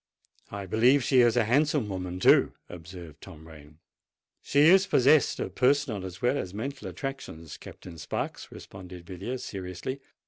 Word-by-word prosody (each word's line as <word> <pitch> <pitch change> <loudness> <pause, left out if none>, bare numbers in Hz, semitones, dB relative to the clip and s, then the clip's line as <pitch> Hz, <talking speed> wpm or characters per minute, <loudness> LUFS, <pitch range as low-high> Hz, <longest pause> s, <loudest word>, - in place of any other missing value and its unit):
"I 100 -1 -6
believe 120 +8 +3
she 130 +1 +3
is 120 0 +3
a 115 - +3
handsome 140 +1 +1
woman, 90 -2 -5
too!" - - +4
observed 85 -2 -11
Tom 80 -4 -13
Rain. 75 -1 -15 0.6
"She 140 - +1
is 185 +6 +6
possessed 140 +3 +3
of - - -4
personal 130 -6 +1
as 95 +5 -9
well 125 +4 +1
as 90 +1 -6
mental 135 +5 -5
attractions, 135 - -7
Captain 85 -3 -12
Sparks," - - -5
responded 90 -2 -11
Villiers 100 +8 -6
seriously. 95 +8 -6
100 Hz, 150 wpm, -27 LUFS, 90-135 Hz, 0.6 s, is